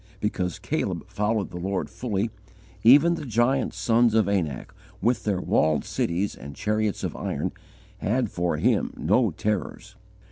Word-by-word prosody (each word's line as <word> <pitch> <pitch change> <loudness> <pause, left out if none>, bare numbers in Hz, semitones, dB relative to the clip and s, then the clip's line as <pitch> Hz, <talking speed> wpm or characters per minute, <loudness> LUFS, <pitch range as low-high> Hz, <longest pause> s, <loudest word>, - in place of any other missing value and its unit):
Because 90 -4 -2
Caleb - - -2
"followed 105 0 -1
the 90 - -6
Lord 95 +2 -2
fully," 110 -2 -2 0.5
even 145 +8 +7
the 165 - -4
giant 125 +2 +1
sons 115 -1 +3
of 110 -3 +4
Anak 90 -9 -2 0.3
with 120 0 +1
their 100 -4 +1
walled 80 -4 +2
cities 90 +4 -1
and 70 +2 -10
chariots 105 -1 -1
of - - -3
iron - - -2 0.5
had 115 +1 0
for 85 -3 -1
him - - +1
no - - +3
terrors. 105 -2 -3
105 Hz, 145 wpm, -25 LUFS, 90-120 Hz, 0.5 s, even